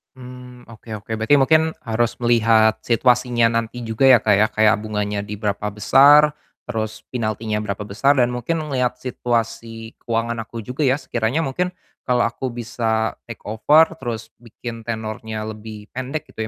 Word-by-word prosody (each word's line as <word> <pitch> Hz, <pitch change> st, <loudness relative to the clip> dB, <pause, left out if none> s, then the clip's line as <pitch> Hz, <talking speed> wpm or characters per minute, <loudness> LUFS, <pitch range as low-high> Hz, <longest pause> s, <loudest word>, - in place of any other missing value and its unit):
Mmm, 125 Hz, -1 st, -12 dB
oke 115 Hz, +1 st, -16 dB
oke, 105 Hz, +2 st, -10 dB
berarti 130 Hz, +7 st, +4 dB
mungkin 155 Hz, +3 st, +3 dB
harus 115 Hz, 0 st, 0 dB
melihat 115 Hz, -2 st, +4 dB
situasinya 120 Hz, -1 st, +2 dB
nanti 115 Hz, +1 st, -6 dB
juga 115 Hz, +4 st, +1 dB
ya, 125 Hz, -4 st, +6 dB
Kak, 105 Hz, -, +2 dB
ya, 110 Hz, -, +4 dB
kayak 110 Hz, -1 st, +3 dB
bunganya 105 Hz, -1 st, -3 dB
di 105 Hz, +1 st, -5 dB
berapa 105 Hz, 0 st, -2 dB
besar, 140 Hz, +8 st, +5 dB, 0.3 s
terus 110 Hz, -2 st, -4 dB
pinaltinya 110 Hz, -2 st, -2 dB
berapa 105 Hz, -1 st, -4 dB
besar 135 Hz, +8 st, +2 dB
dan 125 Hz, -1 st, +2 dB
mungkin 155 Hz, +7 st, -2 dB
ngeliat 130 Hz, -4 st, -1 dB
situasi 115 Hz, -2 st, -3 dB
keuangan 115 Hz, 0 st, -2 dB
aku 115 Hz, 0 st, -7 dB
juga 130 Hz, +4 st, -1 dB
ya, 130 Hz, -, +3 dB
sekiranya 125 Hz, +2 st, -1 dB
mungkin 160 Hz, +7 st, -1 dB, 0.4 s
kalau 125 Hz, -1 st, +2 dB
aku 115 Hz, +3 st, -2 dB
bisa 115 Hz, -2 st, -2 dB, 0.2 s
take 115 Hz, -, -9 dB
over 150 Hz, +11 st, +4 dB
terus 120 Hz, -4 st, -5 dB
bikin 115 Hz, 0 st, -9 dB
tenornya 110 Hz, -1 st, -4 dB
lebih 110 Hz, -1 st, -9 dB
pendek 135 Hz, +4 st, -4 dB
gitu 110 Hz, 0 st, -4 dB
115 Hz, 155 wpm, -21 LUFS, 110-125 Hz, 0.4 s, ya